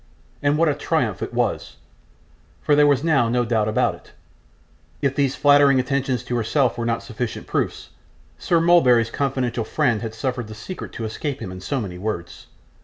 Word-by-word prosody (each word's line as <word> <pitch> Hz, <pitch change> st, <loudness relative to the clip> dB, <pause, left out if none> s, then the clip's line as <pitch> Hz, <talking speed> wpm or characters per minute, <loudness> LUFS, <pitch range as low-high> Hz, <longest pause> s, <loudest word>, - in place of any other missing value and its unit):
and 145 Hz, +1 st, +2 dB
what 165 Hz, +1 st, +3 dB
a 150 Hz, -, +3 dB
triumph -, -, -1 dB
it -, -, -4 dB
was, -, -, -2 dB, 0.8 s
for 145 Hz, -, +2 dB
there 145 Hz, 0 st, +5 dB
was 140 Hz, -1 st, +2 dB
now 140 Hz, -8 st, +2 dB
no 120 Hz, +1 st, +1 dB
doubt 110 Hz, -2 st, +1 dB
about 110 Hz, -, +1 dB
it. -, -, -16 dB, 0.9 s
If 135 Hz, -1 st, 0 dB
these 140 Hz, -2 st, +1 dB
flattering 145 Hz, -2 st, +5 dB
attentions 130 Hz, -2 st, -1 dB
to 125 Hz, -, -3 dB
herself 120 Hz, +2 st, +1 dB
were 120 Hz, -1 st, -3 dB
not 115 Hz, 0 st, -1 dB
sufficient 115 Hz, 0 st, -5 dB
proofs, -, -, -3 dB, 0.5 s
Sir 170 Hz, -, +2 dB
Mulberry's 125 Hz, -10 st, +4 dB
confidential 130 Hz, -4 st, -1 dB
friend 120 Hz, -1 st, 0 dB
had 115 Hz, -1 st, -5 dB
suffered 125 Hz, -1 st, -3 dB
the 110 Hz, -, -9 dB
secret 180 Hz, -, -8 dB
to 115 Hz, -, -5 dB
escape 135 Hz, +5 st, -4 dB
him 100 Hz, -5 st, -6 dB
in 95 Hz, 0 st, -9 dB
so 130 Hz, +9 st, -2 dB
many 90 Hz, -6 st, -6 dB
words. 90 Hz, -4 st, -5 dB
125 Hz, 180 wpm, -22 LUFS, 115-145 Hz, 0.9 s, there